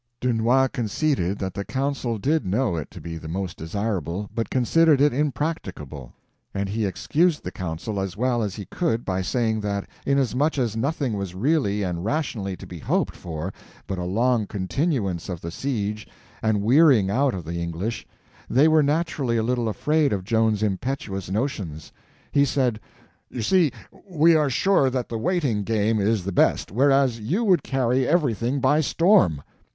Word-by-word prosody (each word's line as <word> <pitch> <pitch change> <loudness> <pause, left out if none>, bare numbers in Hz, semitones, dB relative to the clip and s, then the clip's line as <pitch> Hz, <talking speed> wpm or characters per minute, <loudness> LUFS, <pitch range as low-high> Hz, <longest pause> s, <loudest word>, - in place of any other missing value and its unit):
Dunois 125 +2 +2
conceded 115 - -1
that 95 -1 -4
the 100 - -4
council 130 -2 -2
did 145 +7 +1
know 105 +1 0
it 80 -3 -4
to - - -11
be 80 -1 -6
the 80 - -9
most 90 +2 -4
desirable, 95 +1 -3
but 115 - -2
considered 150 +4 +3
it 145 -1 +4
impracticable; 125 - -3 0.4
and 100 0 -1
he 105 0 -1
excused 150 - +1
the 90 - -5
council 90 +4 -4
as 95 -1 -4
well 125 0 +1
as 105 -3 -2
he 100 - -7
could 135 - -1
by 95 -1 -1
saying 110 +3 0
that 100 -1 -3 0.2
inasmuch 140 +2 +1
as 120 -5 0
nothing 135 +1 -1
was 100 -3 -4
really 105 - +1
and 90 -2 -3
rationally 110 - -2
to - - -10
be - - -9
hoped - - -1
for 85 +2 -5 0.3
but 95 - -4
a - - -2
long 110 +4 +1
continuance 100 - -2
of 90 -3 -5
the 85 - -5
siege 105 -4 -3 0.3
and 110 -2 +1
wearying 125 -5 +5
out 130 +2 +2
of 90 -4 -6
the 85 +1 -4
English, 85 +7 -4 0.4
they 140 +5 +5
were 155 -1 +5
naturally 145 -5 0
a 110 - +1
little 120 -1 0
afraid 150 +6 +1
of 100 -3 -1
Joan's 110 0 +1
impetuous 100 -2 -3
notions. 95 - -3 0.4
He 140 - +4
said: 125 -5 +1 0.5
"You 120 - -4
see, 170 - +3 0.4
we 165 -1 +4
are 150 -2 +3
sure 140 +1 +3
that 125 -1 -3
the 115 - -3
waiting 135 - 0
game 110 +1 +1
is 105 -1 +1
the 100 - -3
best, 90 - +2
whereas 135 +1 +3
you 160 - -1
would 185 -8 +4
carry 130 -1 0
everything 140 - +1
by 145 +4 +3
storm." 140 - +3
115 Hz, 170 wpm, -24 LUFS, 95-140 Hz, 0.5 s, wearying